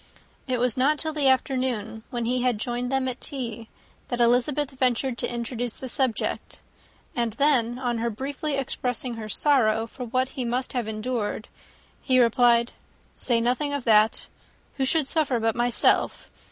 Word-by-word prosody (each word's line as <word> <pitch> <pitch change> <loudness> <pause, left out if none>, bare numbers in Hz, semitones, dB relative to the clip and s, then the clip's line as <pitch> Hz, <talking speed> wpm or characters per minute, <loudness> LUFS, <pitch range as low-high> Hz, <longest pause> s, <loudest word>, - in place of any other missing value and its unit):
It 255 -1 0
was 245 -1 +1
not 285 +4 +3
till 315 +1 -1
the 295 -3 +1
afternoon, 255 -5 0
when 240 -2 -3
he 250 +1 +1
joined 245 +3 -3
them 265 -1 +1
at 255 0 -4
tea, 230 -5 -5 0.4
that 245 - -3
Elizabeth 250 +4 +2
ventured 255 -1 0
to - - -1
introduce 240 0 -3
the 260 - -7
subject; 255 -2 -2 0.6
and 235 -2 -1
then, 245 -3 +2
on 245 -2 -2
her 235 +1 0
briefly 280 +6 -3
expressing 250 -2 -2
her 220 -2 -7
sorrow 225 -4 +3
for 250 +2 -8
what 255 +2 0
he 260 - -4
must 245 +3 -2
have 245 -4 -2
endured, 220 0 -3 0.5
he 255 -2 +3
replied, 235 0 +4 0.4
"Say 235 -2 +1
nothing 250 +5 0
of 285 -3 -2
that. 220 -1 +3 0.5
Who 265 - +1
should 310 +2 +2
suffer 275 -4 +1
but 225 0 +1
myself? 240 0 +1
245 Hz, 160 wpm, -25 LUFS, 235-265 Hz, 0.6 s, replied